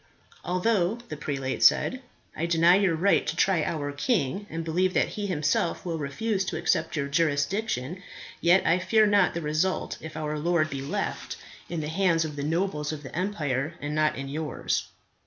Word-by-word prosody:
"Although," 185 +1 +1
the - - -4
prelate 135 -3 -3
said, 255 - +4 0.3
"I 165 - -1
deny 170 +1 +5
your 190 -4 +2
right 195 +5 +2
to - - -1
try 185 -5 +2
our 145 -3 -2
king, 190 - -1
and 165 0 -4
believe 180 +3 +1
that - - +2
he 205 -1 -4
himself 160 0 0
will 165 -2 -2
refuse 190 +9 -1
to - - -3
accept 165 -2 0
your 140 -2 -1
jurisdiction, 165 - 0 0.4
yet 175 +3 +4
I 175 - +3
fear 215 +3 +4
not 205 -4 +3
the 170 - -2
result 155 +5 -1
if 160 0 -8
our 150 -1 -3
lord 165 -1 +1
be 135 -1 -4
left 140 - -3 0.3
in 170 -2 -3
the 150 - -4
hands 165 -1 +2
of 150 -2 -6
the 145 - -4
nobles 155 -1 -1
of 155 -1 -6
the 135 - -9
empire 155 -6 -1
and 145 0 -4
not 155 0 +2
in 135 +1 -5
yours. 150 +2 -2
165 Hz, 185 wpm, -27 LUFS, 150-185 Hz, 0.4 s, deny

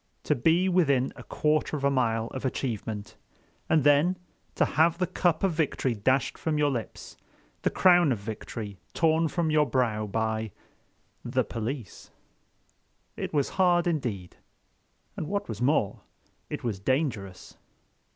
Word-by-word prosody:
To - - +2
be 165 +8 +2
within 140 -8 +2
a - - -10
quarter 155 0 0
of 140 - -7
a 140 - +3
mile 115 -4 +1
of 130 - -6
achievement, 110 -5 -4 0.5
and 155 -3 +4
then 145 +6 +4 0.4
to - - +3
have 165 +2 +2
the 180 - +1
cup 175 -1 0
of 195 - +3
victory 150 -5 0
dashed 130 +5 0
from 155 -2 -1
your 145 -1 +2
lips, 120 -4 -6 0.4
the - - +2
crown 175 -5 +5
of 120 - +1
victory 105 -1 -7 0.2
torn 160 0 +3
from 160 +1 -1
your 150 -1 +3
brow 115 -4 0
by—the 110 0 -4
police! 115 0 -6 1.1
It - - -4
was 145 -3 +1 0.4
indeed 120 - -2
hard. - - -34 0.7
And 155 - -3
what 200 +3 -2
was - - -6
more, 125 -6 +1 0.5
it - - -5
was 110 -5 -2
dangerous. 105 - -2
135 Hz, 140 wpm, -27 LUFS, 110-160 Hz, 1.1 s, crown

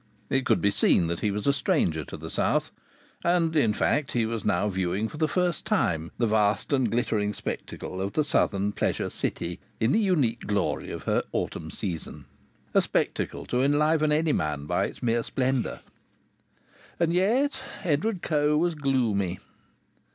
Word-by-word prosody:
It 135 -1 +1
could - - +3
be 100 - +3
seen 90 - +3
that 85 0 -2
he 105 - 0
was 105 +1 -3
a 140 - +4
stranger 115 - +1
to - - -8
the - - -8
south; - - +1 0.5
and, 170 -2 +2
in 115 -8 +4
fact, 140 +6 0
he 120 -2 +2
was 115 -1 -3
now 90 +4 +1
viewing 95 +2 -1
for 150 - -9
the 155 0 +2
first 175 -2 0
time 80 +1 0
the 120 - +2
vast 105 +2 +1
and 130 -4 +2
glittering 105 -3 0
spectacle 95 - -5
of 100 +1 -3
the 155 - +2
southern 100 -8 +1
pleasure - - -1
city 85 +1 -3 0.2
in 115 +3 +2
the - - +4
unique 150 - +1
glory 105 -2 -1
of - - -6
her - - +1
autumn - - -3
season. 85 -3 -5 0.5
A - - +5
spectacle - - -1
to 125 - 0
enliven 150 +2 +3
any 155 0 +2
man 75 -2 -1
by - - +1
its - - -8
mere 120 0 +2
splendour! 130 +1 -1 1.2
And 170 -1 +2
yet 235 +11 +2 0.2
Edward 180 +4 0
Coe 150 -1 +2
was 170 +2 +2
gloomy. 120 - 0
125 Hz, 170 wpm, -27 LUFS, 100-155 Hz, 1.2 s, A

